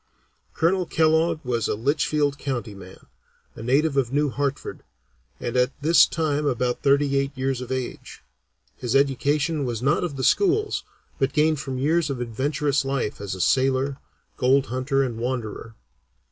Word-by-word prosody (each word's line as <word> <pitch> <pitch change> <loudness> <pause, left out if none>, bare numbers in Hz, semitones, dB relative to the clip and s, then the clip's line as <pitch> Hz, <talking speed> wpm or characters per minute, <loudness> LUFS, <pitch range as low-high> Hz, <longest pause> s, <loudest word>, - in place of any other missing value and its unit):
Colonel 180 +2 +1
Kellogg 160 -1 +2
was 120 -3 0
a - - -1
Litchfield 145 +3 0
County 120 -6 -3
man, 95 -1 -13 0.5
a - - -10
native 140 +6 +2
of 130 -3 +1
New 145 0 +1
Hartford, 140 0 -3 0.6
and 120 - -4
at 125 +2 +1
this 160 +1 +6
time 150 -2 -1
about 125 -2 -1
thirty 140 0 +3
eight 140 0 -3
years 130 -1 -1
of 125 - -7
age. 130 -1 -5 0.5
His 125 0 -3
education 145 +3 +1
was 120 -2 -3
not 145 +7 +2
of 165 -5 -3
the 130 - -3
schools, 410 - +2 0.4
but 135 0 +1
gained 155 0 +2
from 135 -2 -4
years 155 +4 +1
of 135 -3 -3
adventurous 140 +4 -1
life 135 -7 -2
as 95 -3 -3
sailor, 135 +1 +1 0.4
gold 135 +2 +3
hunter, 135 +2 +1
and 120 -4 -4
wanderer. 115 -2 -4
135 Hz, 155 wpm, -24 LUFS, 125-150 Hz, 0.6 s, this